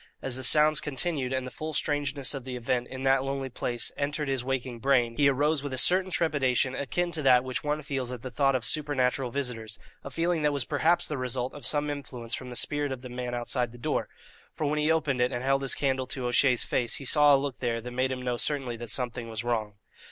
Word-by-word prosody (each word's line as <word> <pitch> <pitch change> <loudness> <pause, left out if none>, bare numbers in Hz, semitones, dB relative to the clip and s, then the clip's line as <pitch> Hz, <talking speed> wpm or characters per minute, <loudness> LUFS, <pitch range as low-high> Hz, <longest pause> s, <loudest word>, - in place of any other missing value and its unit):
As 130 -2 -2
the 130 - -4
sounds 150 +2 +5
continued 145 -2 -1
and 130 -1 -1
the 130 - -7
full 155 +4 -5
strangeness 145 -3 +1
of 135 -3 -5
the 130 0 -6
event, 125 0 -1
in 130 0 -7
that 135 0 +3
lonely 135 0 -3
place, 120 -1 -2
entered 145 0 -2
his 135 -2 -1
waking 130 -2 -3
brain, 120 -2 +2
he 140 +1 +4
arose 145 +2 +1
with 145 -2 -5
a - - -3
certain 185 +7 +5
trepidation 135 -7 +1
akin 175 +6 -1
to 160 -2 -2
that 125 -3 +5
which 130 -1 -3
one 150 +1 -1
feels 135 -3 -3
at 125 -2 -7
the 130 - -6
thought 135 +1 +2
of 120 -3 -1
supernatural 135 -1 0
visitors, 115 -4 -4 0.3
a - - -6
feeling 170 0 0
that 150 0 +2
was 140 -3 0
perhaps 165 +4 +2
the 150 -3 -3
result 125 0 -1
of 140 -4 -5
some 145 +1 +1
influence 125 -4 -6
from 130 0 -4
the 125 - -7
spirit 145 +2 -1
of 130 -1 -6
the 125 - -7
man 125 0 -4
outside 120 0 0
the 120 - -12
door; 120 - -2 0.5
for 155 - -2
when 150 +1 0
he 150 +1 +2
opened 145 -6 +1
it, 125 +1 +2
and 120 0 -3
held 135 +1 +2
his 135 -2 +1
candle 130 -2 0
to 130 -2 -4
O'Shea's 125 0 +3
face, 120 -2 0
he 135 - -5
saw 145 +1 +6
a - - +4
look 135 -1 -4
there 120 -2 -1
that 125 +2 -7
made 130 +1 0
him 130 -1 -4
know 125 -1 -1
certainly 135 -3 -1
that 120 0 -7
something 120 -2 -2
was 110 0 -4
wrong. 110 -4 -2
130 Hz, 245 wpm, -28 LUFS, 125-145 Hz, 0.5 s, saw